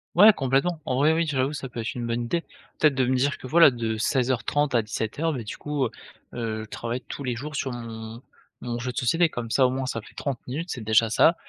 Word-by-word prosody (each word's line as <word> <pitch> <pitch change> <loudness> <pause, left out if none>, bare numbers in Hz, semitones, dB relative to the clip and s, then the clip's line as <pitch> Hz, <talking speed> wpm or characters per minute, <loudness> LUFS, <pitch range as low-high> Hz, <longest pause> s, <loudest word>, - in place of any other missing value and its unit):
Ouais, 210 +5 +9
complètement, 145 +4 0
en 130 -2 -1
vrai, 150 +3 +4
oui, 165 +1 +1
j'avoue 140 -2 0
ça 135 -3 -5
peut 120 - -7
être 115 - -3
une 120 -1 -3
bonne 120 +1 -1
idée. 165 +8 -1 0.4
Peut-être 150 -2 +4
de 130 -1 +2
me 130 - +1
dire 140 +3 +1
que 130 - -9
voilà 165 +1 +7
de 115 -2 -2
16:30 130 +4 +1
à 115 - +5
17:00 110 +8 -3
heures, - - 0
bah, 125 -5 -4
du 105 - -6
coup, 145 -3 -2
heu - - -1 0.4
heu, 110 -2 -3
je - - -21
travaille 120 +2 -3
tous 140 - -8
les 125 -2 -1
jours 150 +3 -6
sur 135 -1 -2
mon 115 -1 -7 0.4
mon 120 -1 -4
jeu 125 +1 -3
de - - -13
société, 165 +8 +3
comme 120 -4 -5
ça 130 +3 +4
au - - +4
moins 130 0 -2
ça 115 - -3
fait - - -16
30 140 -4 -3
minutes, 160 +8 -4
c'est 125 -8 -4
déjà 110 +1 +4
ça, 165 +9 +5
130 Hz, 260 wpm, -25 LUFS, 115-145 Hz, 0.4 s, Ouais